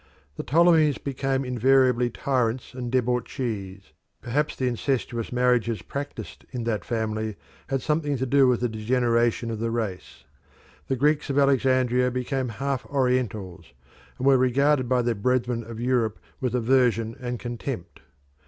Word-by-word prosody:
The -, -, -4 dB
Ptolemies 160 Hz, -1 st, +4 dB
became 135 Hz, -1 st, -2 dB
invariably 125 Hz, 0 st, +3 dB
tyrants 125 Hz, -3 st, -1 dB
and 125 Hz, -2 st, -5 dB
debauchees 115 Hz, -6 st, -2 dB, 0.3 s
perhaps 145 Hz, +5 st, -1 dB
the 130 Hz, -, -1 dB
incestuous 120 Hz, -1 st, -2 dB
marriages 120 Hz, -5 st, +1 dB
practised 140 Hz, +1 st, -7 dB
in 125 Hz, -3 st, -4 dB
that 110 Hz, -5 st, -1 dB
family 110 Hz, -2 st, -2 dB, 0.3 s
had 135 Hz, -1 st, -2 dB
something 150 Hz, -2 st, 0 dB
to 130 Hz, -, -1 dB
do 135 Hz, +1 st, +4 dB
with 125 Hz, -2 st, +2 dB
the 125 Hz, -, +2 dB
degeneration 115 Hz, +1 st, +1 dB
of 110 Hz, -, -4 dB
the 115 Hz, +1 st, -1 dB
race. 110 Hz, -5 st, -4 dB, 0.6 s
The 135 Hz, -, 0 dB
Greeks 150 Hz, +3 st, +1 dB
of 140 Hz, -, -1 dB
Alexandria 130 Hz, -2 st, +3 dB
became 125 Hz, +1 st, -2 dB
half 135 Hz, +3 st, -2 dB
Orientals, 110 Hz, -, -1 dB, 0.4 s
and 130 Hz, -, -3 dB
were 135 Hz, -1 st, +5 dB
regarded 130 Hz, +1 st, +2 dB
by 125 Hz, -1 st, +2 dB
their 120 Hz, 0 st, +1 dB
brethren 120 Hz, +2 st, 0 dB
of 115 Hz, 0 st, -8 dB
Europe 120 Hz, -3 st, 0 dB, 0.2 s
with 125 Hz, -3 st, -1 dB
aversion 120 Hz, -2 st, +2 dB
and 125 Hz, -2 st, -4 dB
contempt. 120 Hz, -7 st, -6 dB
125 Hz, 145 wpm, -25 LUFS, 115-135 Hz, 0.6 s, were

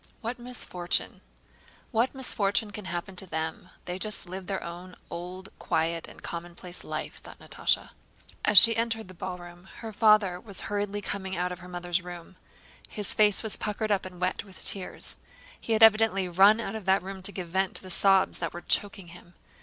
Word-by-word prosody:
"What 240 Hz, +2 st, -4 dB
misfortune? 220 Hz, -8 st, -2 dB, 0.7 s
What 240 Hz, +3 st, +1 dB
misfortune 210 Hz, -5 st, 0 dB
can 210 Hz, -1 st, -8 dB
happen 175 Hz, +1 st, -5 dB
to 190 Hz, -, -5 dB
them? 160 Hz, +2 st, -4 dB, 0.2 s
They 180 Hz, +1 st, -4 dB
just 215 Hz, -2 st, +2 dB
live 185 Hz, +1 st, -7 dB
their 195 Hz, -1 st, -3 dB
own 175 Hz, +2 st, -8 dB, 0.2 s
old, 180 Hz, +2 st, -7 dB
quiet, 165 Hz, +1 st, -1 dB
and -, -, -14 dB
commonplace 175 Hz, +1 st, -6 dB
life," -, -, -5 dB
thought -, -, -12 dB
Natásha. -, -, -1 dB, 0.5 s
As 210 Hz, -, +4 dB
she 230 Hz, +5 st, +10 dB
entered 225 Hz, -3 st, -1 dB
the -, -, -10 dB
ballroom 175 Hz, 0 st, -8 dB, 0.2 s
her 225 Hz, -2 st, -6 dB
father 210 Hz, -4 st, +4 dB
was 200 Hz, -1 st, -5 dB
hurriedly 205 Hz, 0 st, -2 dB
coming 190 Hz, -2 st, -4 dB
out 180 Hz, +1 st, -1 dB
of 180 Hz, -, -6 dB
her 180 Hz, 0 st, -11 dB
mother's 175 Hz, 0 st, -2 dB
room. 175 Hz, 0 st, -10 dB, 0.5 s
His 210 Hz, -2 st, -1 dB
face 210 Hz, -1 st, +4 dB
was 220 Hz, -, -1 dB
puckered 215 Hz, +1 st, -2 dB
up 195 Hz, -2 st, +1 dB
and 180 Hz, -1 st, -12 dB
wet 185 Hz, 0 st, -1 dB
with 195 Hz, -2 st, -4 dB
tears. 195 Hz, -2 st, +2 dB, 0.4 s
He 230 Hz, -, -2 dB
had 220 Hz, 0 st, +4 dB
evidently 215 Hz, -3 st, +5 dB
run 195 Hz, +5 st, +6 dB
out 220 Hz, -2 st, -4 dB
of 220 Hz, -4 st, -6 dB
that 190 Hz, 0 st, +3 dB
room 190 Hz, 0 st, -7 dB
to 195 Hz, -, +3 dB
give 185 Hz, -3 st, -6 dB
vent 190 Hz, +2 st, 0 dB
to -, -, -5 dB
the 185 Hz, -, -8 dB
sobs 195 Hz, +1 st, +3 dB
that 165 Hz, -2 st, -3 dB
were 175 Hz, -, -7 dB
choking 195 Hz, -2 st, 0 dB
him. 175 Hz, 0 st, -15 dB
190 Hz, 190 wpm, -28 LUFS, 180-210 Hz, 0.7 s, she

